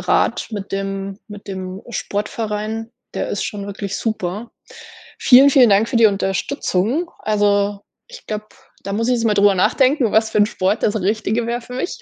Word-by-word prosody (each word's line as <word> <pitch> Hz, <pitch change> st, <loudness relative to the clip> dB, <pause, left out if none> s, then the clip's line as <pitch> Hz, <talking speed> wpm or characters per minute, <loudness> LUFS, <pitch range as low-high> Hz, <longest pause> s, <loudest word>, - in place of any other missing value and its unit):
Rat -, -, +1 dB
mit 205 Hz, -3 st, -6 dB
dem 195 Hz, 0 st, -4 dB
mit 205 Hz, -1 st, -11 dB
dem 190 Hz, 0 st, -6 dB
Sportverein, 215 Hz, +1 st, -3 dB, 0.2 s
der -, -, -2 dB
ist 205 Hz, -, -2 dB
schon 200 Hz, -1 st, -5 dB
wirklich 200 Hz, -1 st, -5 dB
super. 215 Hz, 0 st, -3 dB, 0.7 s
Vielen, 270 Hz, +2 st, +7 dB
vielen 255 Hz, -3 st, +6 dB
Dank 205 Hz, +3 st, +4 dB
für 235 Hz, -, -1 dB
die 230 Hz, -1 st, +7 dB
Unterstützung. 205 Hz, -, -1 dB
Also, 205 Hz, -1 st, +1 dB, 0.3 s
ich -, -, -12 dB
glaube, 215 Hz, 0 st, -4 dB, 0.4 s
da 200 Hz, -, -4 dB
muss 230 Hz, +3 st, -1 dB
ich 250 Hz, -, +3 dB
jetzt 230 Hz, -, -2 dB
mal 215 Hz, -, +2 dB
darüber 200 Hz, 0 st, +4 dB
nachdenken, 255 Hz, -, +2 dB
was 220 Hz, 0 st, +3 dB
für -, -, 0 dB
'n 205 Hz, -, +5 dB
Sport 200 Hz, 0 st, -1 dB
das 210 Hz, -, +1 dB
Richtige 215 Hz, +4 st, 0 dB
wäre 240 Hz, +1 st, -2 dB
für 250 Hz, +1 st, -10 dB
mich. 360 Hz, -, -4 dB
210 Hz, 180 wpm, -19 LUFS, 200-230 Hz, 0.7 s, Vielen